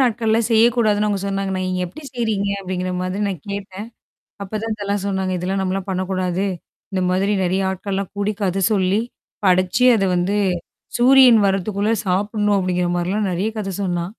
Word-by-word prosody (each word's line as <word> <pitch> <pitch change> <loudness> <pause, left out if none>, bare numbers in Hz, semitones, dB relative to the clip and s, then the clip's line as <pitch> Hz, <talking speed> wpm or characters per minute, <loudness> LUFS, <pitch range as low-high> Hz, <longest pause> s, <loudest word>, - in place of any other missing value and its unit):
நாட்கள்லாம் 225 -2 +2
செய்யக்கூடாதுன்னு 220 -2 +3
அவங்க 200 -2 -1
சொன்னாங்க 195 0 -2
நான், 185 - -2
நீங்க 185 0 -1
எப்படி 245 - -11
செய்றீங்க? 220 -4 -1
அப்படிங்கிற 185 -1 -3
மாதிரி 185 +2 -3
நான் 180 -7 -5
கேட்டேன். 200 +1 -6 0.6
அப்பதான் 215 +3 -3
இதெல்லாம் 205 -1 -2
சொன்னாங்க. 190 -1 -1
இதெல்லாம் 190 +2 -2
நம்மலாம் 190 +1 -2
பண்ணக்கூடாது. 185 0 -1 0.5
இந்த 190 -1 -1
மாதிரி 195 +3 +1
நெறைய 185 +2 0
ஆட்கள்லாம் 195 0 -3
கூடி 205 +1 0
கத 195 -1 0
சொல்லி, 195 +1 +2 0.4
படிச்சு 185 +5 +3
அத 195 - +1
வந்து, 180 +4 0 0.6
சூரியன் 250 -1 +7
வரத்துக்குள்ள 200 +2 0
சாப்பிடணும் 205 +2 +1
அப்படிங்கிற 180 -1 0
மாரிலாம் 190 +4 -1
நெறைய 185 +5 -1
கதை 195 -2 -4
சொன்னா. 175 -2 -1
195 Hz, 150 wpm, -20 LUFS, 185-210 Hz, 0.6 s, சூரியன்